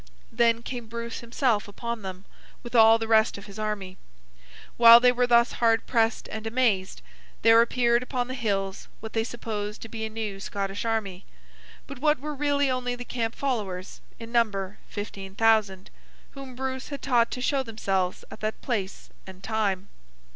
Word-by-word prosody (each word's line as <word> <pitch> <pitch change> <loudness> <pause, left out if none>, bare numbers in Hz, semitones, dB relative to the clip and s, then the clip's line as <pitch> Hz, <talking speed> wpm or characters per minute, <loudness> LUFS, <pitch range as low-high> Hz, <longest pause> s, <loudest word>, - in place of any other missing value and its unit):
Then 230 0 +2
came 240 -3 -6
Bruce 235 +1 -6
himself 235 -3 0
upon 235 +2 -5
them, 190 0 -8 0.4
with 240 - -9
all 225 -1 +7
the 225 0 -4
rest 220 -1 +3
of 200 - -10
his 200 +1 -10
army. 205 -3 -4 0.8
While 235 0 +10
they 250 0 +5
were 245 0 +1
thus 235 0 +4
hard 230 -1 +2
pressed 225 -2 +1
and 220 +1 -5
amazed, 220 - 0 0.4
there 225 +1 +7
appeared 235 0 +2
upon 250 -1 -3
the 255 - -5
hills 200 -6 -2
what 220 0 -8
they 225 - +1
supposed 215 -3 -5
to 225 - -9
be 220 -1 -5
a 220 - -2
new 215 -3 -5
Scottish 195 +1 -4
army, 205 -5 -2 0.6
but 275 -3 -9
what 300 +2 +3
were 300 +2 -5
really 285 0 +1
only 250 -1 -1
the 245 0 -8
camp 230 -2 -3
followers, 205 -9 -3 0.2
in 230 0 -10
number 205 -5 0
fifteen 195 -2 -7
thousand: 215 -4 +2 0.4
whom 270 -2 -10
Bruce 260 0 -4
had 280 -2 -7
taught 240 -4 +3
to - - -5
show 270 +2 +1
themselves 195 -6 -2
at - - -10
that 215 0 -3
place 200 -6 -4 0.2
and 190 0 -12
time. 200 -3 -1
225 Hz, 175 wpm, -26 LUFS, 205-245 Hz, 0.8 s, While